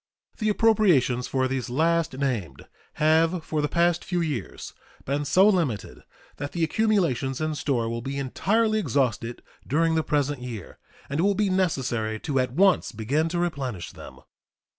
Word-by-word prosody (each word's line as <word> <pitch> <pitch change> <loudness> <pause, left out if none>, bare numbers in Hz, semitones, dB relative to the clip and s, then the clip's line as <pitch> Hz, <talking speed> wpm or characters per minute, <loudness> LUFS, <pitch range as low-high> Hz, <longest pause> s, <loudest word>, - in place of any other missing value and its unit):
The 215 -1 +1
appropriations 185 - +3
for 130 -1 0
these 130 -2 -3
last 160 +2 +1
named 125 -10 -3 0.3
have 160 +2 +2
for 155 -1 -1
the 150 - +1
past 170 +2 +2
few 180 -1 -2
years 145 - -4 0.3
been 145 +2 -1
so 190 +7 +5
limited 160 - 0 0.4
that 145 0 -5
the 170 - -1
accumulations 160 - +1
in 155 0 -1
store 130 -6 -1
will 115 +1 -3
be 135 +3 -4
entirely 215 - +1
exhausted 125 - -1 0.2
during 165 +4 +2
the 160 - +2
present 145 -3 -1
year, 115 -7 -8 0.3
and 140 +2 -3
it - - +2
will 200 0 +3
be 205 -1 +1
necessary 120 -12 0
to 135 -2 -1
at 125 -1 0
once 185 - +3
begin 135 +9 -1
to 175 - -2
replenish 135 - -3
them. - - -12
145 Hz, 160 wpm, -25 LUFS, 125-175 Hz, 0.4 s, so